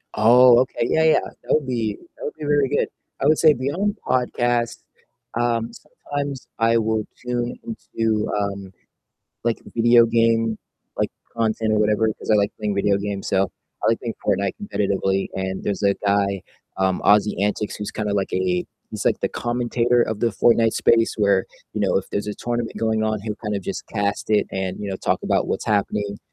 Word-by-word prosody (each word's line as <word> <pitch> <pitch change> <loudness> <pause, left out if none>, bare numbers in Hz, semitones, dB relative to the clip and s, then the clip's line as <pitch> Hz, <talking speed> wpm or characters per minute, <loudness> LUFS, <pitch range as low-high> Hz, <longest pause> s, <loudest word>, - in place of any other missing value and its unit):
Oh, 120 +2 +7
okay, 125 -2 0
yeah, 160 - +3
yeah, 160 - +5
that - - -5
would 155 -2 +2
be 115 -5 -2 0.2
that - - -7
would - - -3
be 150 - -6
really 145 -2 +3
good, - - +1 0.3
I 140 - +3
would 155 - +4
say 155 -2 +6
beyond 175 - -1
podcasts, 120 -2 0 0.6
um, 115 -1 0 0.4
sometimes 140 -2 -3
I 115 0 +4
will 110 -1 0 0.2
tune 120 0 -2
into, 115 - -2
um, 100 -2 -3 0.7
like, 115 -1 +1 0.2
video 120 0 +6
game, 115 -1 +2 0.4
like, - - 0 0.3
content 110 -1 0
or 105 - +3
whatever, 105 +1 +2
'cause - - -6
I - - +6
like 100 -1 +2
playing 105 -2 -2
video 100 0 +2
games, 100 -1 -4
so 95 -1 +2 0.4
I - - +4
like 115 - +2
playing 115 -2 -4
Fortnite 100 -1 +1
competitively, 95 - 0
and 95 0 -3
there's 100 0 -2
a 100 0 +4
guy, 100 -1 0 0.3
um, 95 -1 +1
AussieAntics, 105 0 +2
who's 105 - -5
kinda 105 -1 -2
like 100 -1 -1
a 90 -1 0 0.2
he's, - - -4
like, - - +2
the - - 0
commentator 120 0 +1
of 110 -1 -3
the - - +2
Fortnite 115 0 +3
space 115 -1 +3
where, 100 -3 +2 0.3
you - - -3
know, - - +2
if - - -2
there's 100 - -2
a 105 - -3
tournament 120 -1 -3
going 110 -1 0
on, 110 0 0
he'll 105 -1 -3
kind 105 -2 -3
of 100 - -5
just - - -5
cast 100 0 -2
it 105 -2 +3
and, 95 -1 -3
you 100 -1 -4
know, 95 - -3
talk - - -1
about - - +1
what's - - -2
happening 100 0 -1
110 Hz, 190 wpm, -22 LUFS, 100-120 Hz, 0.7 s, Oh